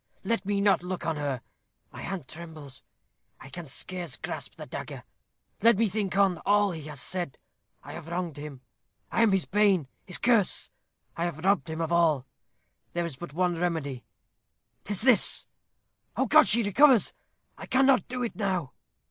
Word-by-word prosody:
Let 230 -4 -1
me 200 -1 +1
not 200 -4 +4
look 180 0 -5
on 165 -2 -1
her. 140 -4 -2 0.5
My - - -9
hand 185 -9 -5
trembles. 155 -4 -10 0.6
I - - -11
can 170 +2 -7
scarce 175 +2 -4
grasp - - -6
the - - -8
dagger. - - -7 0.6
Let 230 -1 +6
me 225 0 +3
think 195 -1 -2
on 195 -4 +3
all 205 -1 +3
he 165 -2 -6
has 150 -3 -7
said. 155 +4 -3 0.5
I - - -9
have 165 - -8
wronged 170 -3 -3
him. 145 -3 -8 0.5
I - - +2
am 225 -3 +5
his 190 -2 +2
bane, 195 -7 +3 0.2
his 180 - 0
curse! 230 -6 +2 0.4
I 170 - -1
have 170 0 -4
robbed 195 -7 +2
him 160 +1 -3
of 165 0 -2
all: 160 -6 +3 0.7
there 175 0 -1
is 165 -5 -5
but 140 +1 -9
one 175 0 0
remedy 150 -8 -2 0.8
'tis 205 0 -2
this! 245 -6 +4 0.7
Oh, 265 - +2
God! 220 - +6
she 230 +2 +5
recovers. 250 +3 +5 0.4
I - - -9
cannot 265 -1 +4
do 250 0 -3
it 235 - -3
now." 185 -9 -2
180 Hz, 175 wpm, -28 LUFS, 160-205 Hz, 0.8 s, Let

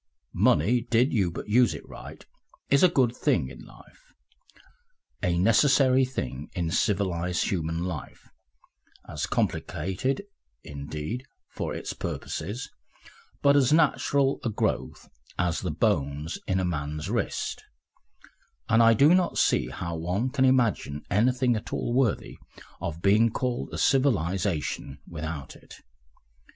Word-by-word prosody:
Money, 115 +11 +3
did 120 +3 +3
you 100 -7 +2
but 85 - -7
use 120 +3 +3
it - - -10
right, - - -11 0.5
is 140 - +5
a 185 - +7
good 125 -7 +2
thing - - +1
in - - -11
life, - - -17 1.1
a 85 -1 +1
necessary 130 - +4
thing 70 - -5
in 85 -2 -2
civilised 90 -4 0
human 85 -2 -2
life, 90 -6 -6 0.8
as - - -3
complicated, 95 - -1 0.4
indeed, 75 - -5 0.3
for - - -4
its - - -5
purposes, 105 +11 -5 0.8
but 140 0 +5
as 135 -2 +4
natural 140 -3 +2
a 120 - 0
growth 105 - -2 0.3
as 90 -2 0
the 90 - -3
bones 75 -3 -1
in 95 0 +1
a 95 - 0
man's 75 -2 -3
wrist, - - -2 1.0
and 110 +1 +4
I 115 0 +6
do 145 +9 +6
not 180 -1 +2
see - - +2
how 85 -1 -5
one 90 +10 -1
can 130 +1 +2
imagine 115 - +1
anything 125 +5 +2
at 110 - -6
all 120 - -2
worthy 125 -4 0 0.4
of 85 -1 -5
being 105 +4 +5
called 125 +1 -2
a - - -5
civilisation 95 - 0
without 80 -3 -6
it. - - -15
100 Hz, 130 wpm, -27 LUFS, 85-125 Hz, 1.1 s, a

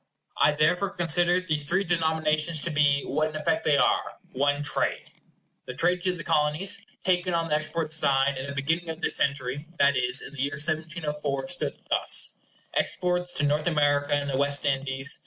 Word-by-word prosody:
I 150 - +4
therefore 180 +6 +1
consider 175 +1 +2
these 155 -5 -2
three 185 +7 +1
denominations 160 -2 0
to 170 - 0
be, 145 -2 +2
what 155 +2 -1
in 155 - -10
effect 160 +1 -1
they 145 -2 +3
are, - - +1 0.2
one 145 +2 0
trade. - - -1 0.6
The 125 - -6
trade 175 +5 +1
to 185 0 +1
the 165 -3 -7
Colonies, 160 +9 +1 0.2
taken 180 -1 +1
on 165 0 -1
the 150 - +2
export 155 +1 -1
side, 140 -3 +2
at 135 - -5
the 140 - -6
beginning 165 +5 -1
of 160 +1 -6
this - - +2
century, 140 +2 -1
that 140 0 +4
is, 125 0 +1
in 140 - -10
the 140 - -5
year 140 +1 -1
1704, 150 -2 -2
stood 175 - -1
thus:— - - +2 0.4
Exports 180 -1 0
to 150 - -1
North 150 +2 +1
America 145 -3 +2
and 145 0 -2
the 135 -2 -1
West 140 +1 0
Indies. 135 0 +1
150 Hz, 185 wpm, -26 LUFS, 140-170 Hz, 0.6 s, I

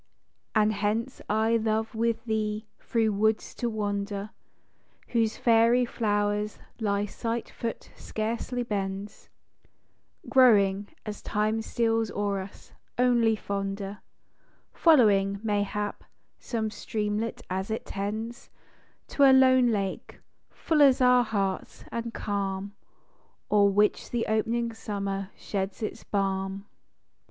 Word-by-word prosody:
And 215 0 +4
hence 215 +5 -2
I 220 +2 +3
love 220 0 -1
with 230 0 -1
thee 215 -1 -1
through 225 -2 0
woods 215 +2 +1
to 240 - -2
wander, 205 -1 -3 0.8
Whose 225 -2 +1
fairy 235 +1 +4
flowers 205 -2 -1 0.2
thy 205 -2 0
slight 230 +3 -4
foot 230 -1 -5
scarcely 235 +3 -3
bends, 200 -2 -4 1.0
Growing, 205 -6 +5 0.2
as 210 -1 -6
time 215 +1 0
steals 225 -1 0
o'er 200 -1 -1
us, 190 +1 -10 0.2
only 240 -3 +3
fonder, 200 0 -4 0.7
Following, 200 - +4
mayhap, 205 -1 -1 0.4
some 220 -3 -3
streamlet 215 0 -3
as 190 +2 -3
it 220 - -3
tends 215 +5 -5 0.6
To - - -2
a 275 - +9
lone 260 -1 +6
lake 200 -4 -2 0.3
â - - -35
full 310 -2 +1
as 275 -3 +6
our 250 -1 +5
hearts, 195 -4 -2
and 230 0 -3
calm, 200 -2 -3 0.8
O'er 205 -1 +5
which 205 +1 +2
the 240 -1 -1
op'ning 230 +2 0
summer 200 -3 -4
sheds 195 +1 -4
its 215 +1 -4
balm. 195 0 -2
215 Hz, 115 wpm, -27 LUFS, 200-230 Hz, 1.0 s, a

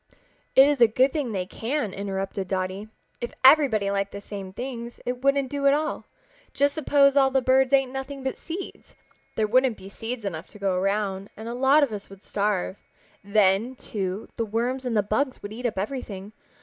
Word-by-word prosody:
"It 265 - +9
is 290 -3 +1
a 235 - +9
good 255 +5 +2
thing 285 -7 -2
they 185 -3 -2
can," 225 +2 -3
interrupted 195 -1 -3
Dotty. 185 +2 -3 0.3
"If 240 - -4
everybody 260 -8 +6
liked 200 0 -1
the 200 - -6
same 200 -2 -7
things 240 +1 -6
it 245 0 -3
wouldn't 275 -1 +2
do 280 -1 +1
at 275 - +6
all. 310 +1 -2 0.5
Just 285 0 +3
suppose 285 -2 +4
all 270 -1 +5
the 265 0 +2
birds 260 +1 +3
ate 270 -1 +5
nothing 270 +1 -6
but 265 - -2
seeds. 360 +3 -8 0.4
There 220 - +2
wouldn't 250 +1 +3
be 190 +1 -11
seeds 225 +2 -5
enough 165 -3 -4
to - - -14
go 195 -2 0
around, 195 +1 -1
and 220 +1 -7
a 235 - -4
lot 270 +4 +4
of 275 - 0
us 205 -2 -7
would 195 0 -14
starve. 200 -2 -1 0.5
Then, 200 +4 +2
too, 195 -3 -4
the 230 - 0
worms 240 +4 -2
and 235 -3 0
the 205 - +3
bugs 255 +6 -1
would 205 +1 -6
eat 245 +2 -2
up 215 - -5
everything. 205 -2 -5
230 Hz, 200 wpm, -25 LUFS, 200-265 Hz, 0.5 s, It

